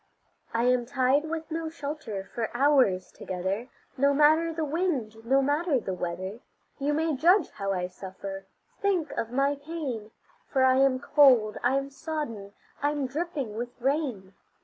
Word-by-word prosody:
I 230 +1 0
am 250 -1 +2
tied 270 +2 +2
with 325 0 -4
no 325 0 -2
shelter 285 -10 -5
for 230 -2 -2
hours 260 -10 +3
together, 190 +6 -4 0.3
No 280 +1 +3
matter 310 +3 +4
the 320 -1 -2
wind, 290 -9 -1
no 270 +4 +3
matter 290 +1 +1
the 190 -4 -4
weather; 185 +4 -4 0.4
You 285 +1 0
may 315 0 +1
judge 345 +5 +4
how 195 -1 -3
I 180 -2 -1
suffer, 195 +1 -8 0.4
think 370 -7 +1
of 225 - -3
my 275 +3 +1
pain, 285 -8 -5 0.4
For 265 -2 +2
I 260 0 +5
am 270 -1 +4
cold, 260 -7 +5
I 250 +2 +2
am 275 0 -3
sodden, 275 -10 -5 0.3
I'm 290 -1 0
dripping 285 -4 -3
with 240 +2 -6
rain. 255 -8 -1
270 Hz, 155 wpm, -28 LUFS, 220-300 Hz, 0.4 s, I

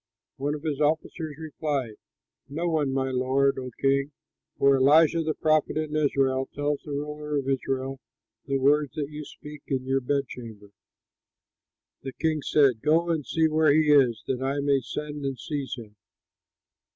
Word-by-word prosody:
One 145 +2 -1
of 150 - -9
his 150 -2 -2
officers 155 0 -1
replied, 150 -6 -3 0.6
"No 165 +5 -2
one, 155 -5 +1
my 135 0 -1
lord, 130 +2 +1
O 130 -1 -5
king, 140 +1 +1 0.5
for 140 0 +5
Elisha, 155 +5 +5
the 155 -1 -1
prophet 155 -1 +1
in 155 -1 -2
Israel, 135 -3 +1
tells 145 0 -1
the - - -12
ruler 150 +1 -3
of 135 -1 -2
Israel 135 0 -2 0.5
the 135 -1 +1
words 145 +1 +2
that 145 -1 -3
you 150 0 -6
speak 150 0 -11
in 130 -2 -2
your 135 +1 +1
bedchamber." 125 -6 -4 1.3
The 135 -1 -6
king 155 -2 -1
said, 135 -6 +3
"Go 165 +3 +2
and 160 -3 -1
see 160 +3 +1
where 155 -1 +3
he 150 0 +4
is, 125 -7 +4
that 130 -1 -2
I 135 +2 -1
may 140 -1 +2
send 150 +3 -6
and 135 -1 -2
seize 140 -3 -4
him." 110 -4 -11
145 Hz, 165 wpm, -26 LUFS, 135-150 Hz, 1.3 s, for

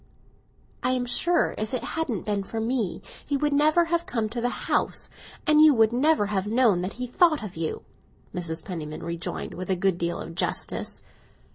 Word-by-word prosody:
"I 255 - +1
am 250 -1 0
sure 340 +8 +2
if 215 +4 -2
it 250 - -3
hadn't 280 - -2
been 205 -1 0
for 225 +3 -5
me 225 -4 -1 0.2
he 285 - -1
would 295 +1 +1
never 310 +4 +4
have 340 +1 -1
come 225 -3 -1
to 235 +2 -3
the 245 - +1
house, - - -1 0.3
and 305 0 +5
you 310 -3 +8
would 225 0 +4
never 290 -2 +3
have 200 -1 -1
known 220 -5 +3
what 185 +2 -3
he 250 - -4
thought 310 +2 +3
of 205 -4 -7
you," 160 -1 -3 0.5
Mrs. 165 -2 -2
Penniman 155 -4 -6
rejoined, 170 0 -4
with 185 +1 -6
a 190 - +3
good 185 -1 +1
deal 170 0 -1
of 165 - -7
justice. 170 - -1
225 Hz, 190 wpm, -26 LUFS, 185-285 Hz, 0.5 s, you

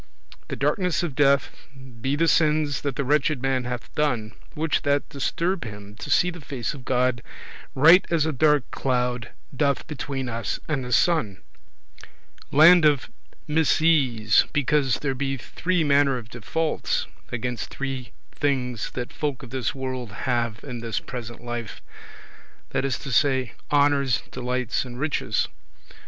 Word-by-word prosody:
The - - -4
darkness 155 +3 0
of 165 -5 -2
death, 140 0 +3 0.5
be 135 +3 0
the 165 +3 +2
sins 150 -3 +2
that 140 -3 -2
the 140 - -1
wretched 150 +1 +2
man 130 -1 0
hath 120 -1 -5
done, 120 -8 0 0.2
which 155 0 0
that 145 -2 +1
disturb 170 +6 -1
[prevent] 105 -3 -6
him 100 0 -13
to - - -7
see 180 0 +3
the 175 -1 -10
face 135 -2 -4
of 140 -4 -10
God, 125 -1 +1 0.5
right 165 +7 +7
as 165 -3 +2
a 160 - 0
dark 150 -1 +3
cloud 125 -2 -1 0.3
doth 140 0 +1
between 135 -3 -4
us 115 -3 -3
and 140 -4 -1
the 125 - -6
sun. 115 - +2 1.1
Land 165 +4 +8
of 145 -3 +3 0.4
misease, 150 -8 +3
because 145 -2 +2
there 135 -2 -2
be 135 +1 -2
three 175 +7 -1
manner 140 -2 +3
of 115 -2 -9
defaults 155 +8 -1 0.3
against 120 0 -3
three 135 -2 -5 0.2
things 125 -5 -1
that 125 -1 -4
folk 145 -3 -3
of 125 - -11
this 130 -2 -2
world 130 -4 -4
have 120 -3 -1
in 125 -4 -6
this 115 -1 -2
present 120 -1 -8
life; 120 -2 -5 0.9
that 135 - 0
is 135 -3 0
to 135 - -7
say, 130 -2 +2 0.2
honours, 140 -3 +3
delights, 125 -2 -1
and 125 -1 -9
riches. 155 0 0
135 Hz, 150 wpm, -24 LUFS, 125-150 Hz, 1.1 s, Land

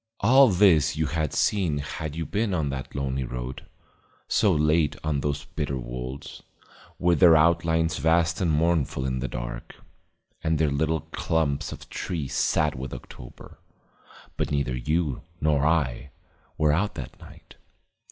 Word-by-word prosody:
All 130 +6 +7
this 85 -6 +4
you 80 - +1
had 75 0 -1
seen 90 -8 +1
had 75 +1 -5
you 80 0 -3
been 105 -2 -1
on 75 -4 -1
that 65 -2 -6
lonely 70 -1 -2
road, 60 +1 -6 0.6
so 105 -4 +3
late 75 -1 +2
on 75 -2 0
those 70 +1 -2
bitter 70 - -3
wolds, 60 +2 -7 0.6
with 85 -1 +2
their 85 -4 +7
outlines 80 0 +2
vast 80 +3 +2
and 90 - +1
mournful 75 -4 +1
in 65 -1 -1
the 65 - -2
dark, - - -6 0.7
and 80 0 +1
their 75 -2 +1
little 80 +3 0
clumps 80 -4 -1
of - - -9
trees 80 -7 -4
sad 75 -1 +1
with 65 -1 -6
October. - - -12 0.8
But - - -1
neither 70 -3 -1
you 75 +2 -1 0.2
nor 75 -1 +2
I 70 -5 0 0.5
were 75 -1 +3
out 100 +6 0
that 65 -4 -8
night. - - -15
75 Hz, 150 wpm, -25 LUFS, 70-80 Hz, 0.8 s, All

